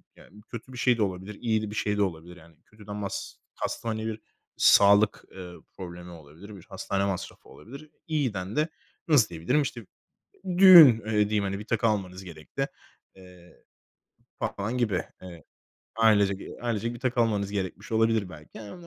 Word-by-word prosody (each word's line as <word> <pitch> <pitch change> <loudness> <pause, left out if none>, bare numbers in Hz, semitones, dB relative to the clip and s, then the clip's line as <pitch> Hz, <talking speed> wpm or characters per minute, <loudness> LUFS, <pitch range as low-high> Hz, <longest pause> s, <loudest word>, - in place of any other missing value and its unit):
yani, 105 +3 -17
kötü 120 +2 -9
bir - - -9
şey 125 -1 +2
de - - -2
olabilir, 95 +1 -4
iyi 110 -3 0
de 110 - -5
bir 105 - -8
şey 105 -1 -1
de - - +1
olabilir, 90 -1 -5
yani, 85 -1 -18
kötüden 105 -1 -11
mas 100 -1 -5 0.3
kastım, - - -4
hani, 110 0 -3
bir 110 -1 -5 0.4
sağlık, 100 +1 +5
eee, 90 -2 -9 0.3
problemi 90 -1 -9
olabilir, 85 +6 -13
bir 95 - -13
hastane 100 0 -2
masrafı 100 -2 -5
olabilir. 140 +7 -13 0.2
İyiden 115 - -2
de 155 +1 +1 0.4
nasıl 145 -9 +4
diyebilirim, 85 - 0
işte, 120 -5 -5 0.7
düğün, 185 -4 +11 0.2
eee, 110 - -3 0.2
diyeyim, 105 -1 0
hani, 100 0 -3
bir 105 - -8
takı 115 -1 0
almanız 95 -3 -2
gerekti, 90 - -6 0.5
eee, 90 -2 -18 0.7
papağan 110 +5 -3
gibi. 105 -7 0 0.2
Evet, 85 -4 -12 0.5
ailecek, 105 -3 +3
eee, - - -10
ailecek 115 -1 -2
bir 120 - -10
takı 125 -1 0
almanız 105 -3 0
gerekmiş 95 0 -5
olabilir 110 -3 +1
belki. 75 +2 -13
Ha 105 -2 -10
105 Hz, 170 wpm, -26 LUFS, 95-115 Hz, 0.7 s, düğün